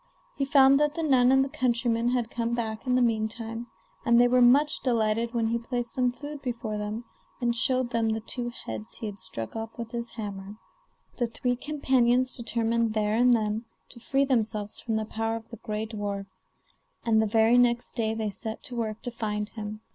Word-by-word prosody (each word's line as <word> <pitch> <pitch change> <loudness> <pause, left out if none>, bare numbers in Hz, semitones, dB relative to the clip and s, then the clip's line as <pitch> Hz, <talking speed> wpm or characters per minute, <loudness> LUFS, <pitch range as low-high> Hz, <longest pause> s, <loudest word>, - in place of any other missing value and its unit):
He 275 - 0
found 275 -1 +6
that 295 0 +1
the 330 - -2
nun 260 -4 +5
and 265 0 +5
the - - -6
countryman 240 -4 +1
had 245 -2 -1
come 235 0 -1
back 225 +1 -3
in 250 - +3
the 255 - +4
meantime, 225 +1 -1 0.4
and 235 0 +5
they 245 - +6
were 250 +1 +4
much 280 +5 +5
delighted 230 -1 +1
when 225 -1 +1
he 235 +1 0
placed 240 0 -4
some 250 -1 +2
food 290 +3 -7
before 230 -5 -3
them, 210 +3 -4 0.4
and 240 -1 +1
showed 255 +1 +2
them 230 -1 +1
the 220 0 0
two 240 +2 -3
heads 110 - -7
he - - -6
had 205 -2 -6
struck 115 - -6
off 225 0 -6
with 230 -1 -6
his 235 0 -3
hammer. 200 -2 -6 0.6
The 240 - +1
three 245 +2 -1
companions 255 -3 +2
determined 230 -1 0
there 210 -1 +1
and 245 +2 +4
then 220 -1 +1 0.2
to 240 - -11
free 275 +3 +1
themselves 220 -5 -1
from 225 -2 -2
the 220 0 -1
power 225 +1 -2
of 225 -1 -7
the 230 - -7
gray 215 -1 -3
dwarf, 205 -3 -4 0.8
and 220 -1 +4
the 220 - +1
very 225 +3 +4
next 240 0 +2
day 220 -2 -1
they 220 -2 -2
set 220 +2 -5
to 255 -4 -5
work 220 -2 -3
to 245 - -4
find 210 -2 -3
him. 215 -1 -7
230 Hz, 205 wpm, -27 LUFS, 220-245 Hz, 0.8 s, found